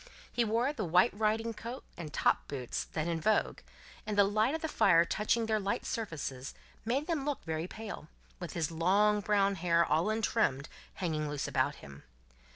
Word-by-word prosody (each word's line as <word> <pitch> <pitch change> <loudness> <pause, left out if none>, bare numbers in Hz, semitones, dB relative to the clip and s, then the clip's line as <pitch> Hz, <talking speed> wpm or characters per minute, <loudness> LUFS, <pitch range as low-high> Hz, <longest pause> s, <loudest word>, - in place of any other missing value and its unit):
He 240 - +2
wore 230 +6 +1
the 225 - -3
white 180 +5 +4
riding 220 +2 0
coat 235 +4 -7
and 165 -4 -7
top - - +1
boots, 130 -4 -4
then 155 +1 -3
in 165 -1 -1
vogue, 215 +6 +1 0.5
and 210 -1 -2
the 200 - +7
light 215 +8 +2
of 320 - -4
the - - +1
fire 170 - +4
touching 215 +5 0
their 220 -1 +1
light 200 +4 -2
surfaces 145 - -4 0.3
made 265 +6 -1
him 325 -5 -1
look 290 -1 -3
very 160 +1 -2
pale, 210 -7 -8 0.3
with 175 -3 -6
his 165 -2 -1
long 200 +6 +3
brown 200 -1 +2
hair, 170 -1 +3
all 160 +6 +1
untrimmed, 215 - 0 0.3
hanging 155 -5 -2
loose 145 -1 -3
about - - +1
him. 70 0 -12
200 Hz, 180 wpm, -32 LUFS, 165-225 Hz, 0.5 s, the